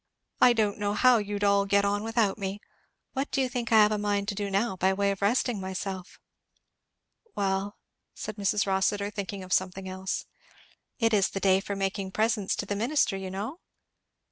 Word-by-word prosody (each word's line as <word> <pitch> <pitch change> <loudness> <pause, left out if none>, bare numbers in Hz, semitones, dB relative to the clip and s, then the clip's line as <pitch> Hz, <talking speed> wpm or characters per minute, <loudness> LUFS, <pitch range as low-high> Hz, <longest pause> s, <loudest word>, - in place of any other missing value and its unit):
"I 245 - +7
don't 215 -3 0
know 205 0 0
how 250 0 +5
you'd 205 0 -3
all 200 0 +3
get 200 0 +3
on 205 0 0
without 225 -2 +1
me. 195 +1 -3 0.5
What 270 +2 -2
do - - -1
you 260 - +2
think 245 -2 -4
I - - +5
have 210 - +3
a 210 - 0
mind 205 -1 0
to - - -1
do 200 0 -3
now, 195 +2 0
by 190 +1 +2
way 200 +1 +1
of 195 - -5
resting 225 0 +1
myself?" 190 0 -5 1.2
"Well?" 195 0 -1 0.4
said 215 0 -6
Mrs 205 0 +1
Rossitur, 200 +1 0
thinking 200 -1 -5
of 185 -1 -3
something 190 +1 0
else. 190 0 -4 0.7
"It 230 -2 +2
is 200 -2 +3
the 195 - -4
day 190 -1 +4
for 200 +1 -4
making 195 0 -2
presents 220 -2 +1
to - - -3
the 205 - -2
minister, 235 0 +1
you 190 -1 -5
know?" 210 - -5
200 Hz, 195 wpm, -28 LUFS, 195-215 Hz, 1.2 s, I